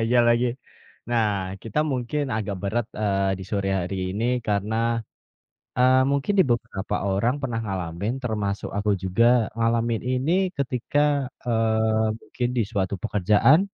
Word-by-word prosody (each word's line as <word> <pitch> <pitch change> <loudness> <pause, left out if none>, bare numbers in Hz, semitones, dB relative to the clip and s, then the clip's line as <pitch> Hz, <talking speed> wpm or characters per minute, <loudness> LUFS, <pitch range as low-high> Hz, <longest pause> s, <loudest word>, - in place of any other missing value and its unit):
iya 125 - +5
lagi. 120 +1 +3 0.6
Nah, 115 -2 +3 0.4
kita 115 +5 -3
mungkin 130 +4 -1
agak 100 -2 -3
berat, 110 +3 -1
eee, 100 -2 +1
di - - -7
sore 100 -2 0
hari 90 +3 -4 0.2
ini 110 +3 -1 0.2
karena, 105 +2 0 1.0
eee, 130 +1 +5
mungkin 140 +7 +1
di - - +8
beberapa 115 -4 -2 0.2
orang 115 +6 +1
pernah 120 -3 -2
ngalamin 95 +1 -3
termasuk 105 -4 -2
aku 105 +1 0
juga 95 +5 +2 0.3
ngalamin 115 0 +1
ini 130 +5 +1 0.3
ketika, 125 +1 -1 0.5
eee, 110 -1 +2
mungkin 120 -1 -3
di 120 - +3
suatu 100 -3 -1
pekerjaan, 110 - +4
110 Hz, 135 wpm, -24 LUFS, 100-120 Hz, 1.0 s, di